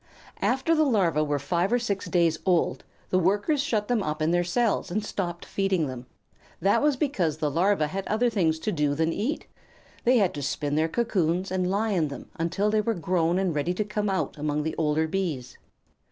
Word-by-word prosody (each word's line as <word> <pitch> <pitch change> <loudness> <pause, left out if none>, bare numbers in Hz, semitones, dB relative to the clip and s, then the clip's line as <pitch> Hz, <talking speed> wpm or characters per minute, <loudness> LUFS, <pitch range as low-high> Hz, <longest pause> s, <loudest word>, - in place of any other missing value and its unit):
After 265 +6 +2
the 310 -1 +4
Larvæ 175 - +2
were 145 0 +1
five 170 +7 0
or 245 - +4
six 205 -5 -2
days 170 -3 +2
old, 180 -3 +1 0.3
the 185 - +3
Workers 205 - +2
shut 215 -7 -1
them 245 -3 +1
up 150 -4 -3
in 155 +1 +1
their 175 0 +2
cells 220 +5 0
and 210 +4 -2
stopped 175 -5 -4
feeding 195 -4 0
them. 130 -2 -7 0.5
That 200 +4 +3
was 295 -1 +3
because 185 - 0
the 150 -2 -1
Larvæ 175 0 +2
had 190 +5 -4
other 225 +3 +2
things 175 -9 +1
to 215 - -1
do 150 -5 0
than 160 +2 +1
eat. 275 +10 -2 0.6
They 250 +1 +4
had 195 -5 +2
to 145 - -5
spin 145 +1 -2
their 160 +2 +2
cocoons, 185 -4 0
and 185 -1 0
lie 210 +3 0
in 170 -6 +1
them 140 - -9
until 185 +6 0
they 215 0 +3
were 225 +1 -1
grown 170 0 +1
and 190 -3 0
ready 150 +5 -1
to 210 - 0
come 210 0 -2
out 190 -4 -2
among 150 0 -1
the 160 - -2
older 155 0 +1
Bees. 160 -8 -3
180 Hz, 210 wpm, -26 LUFS, 160-210 Hz, 0.6 s, the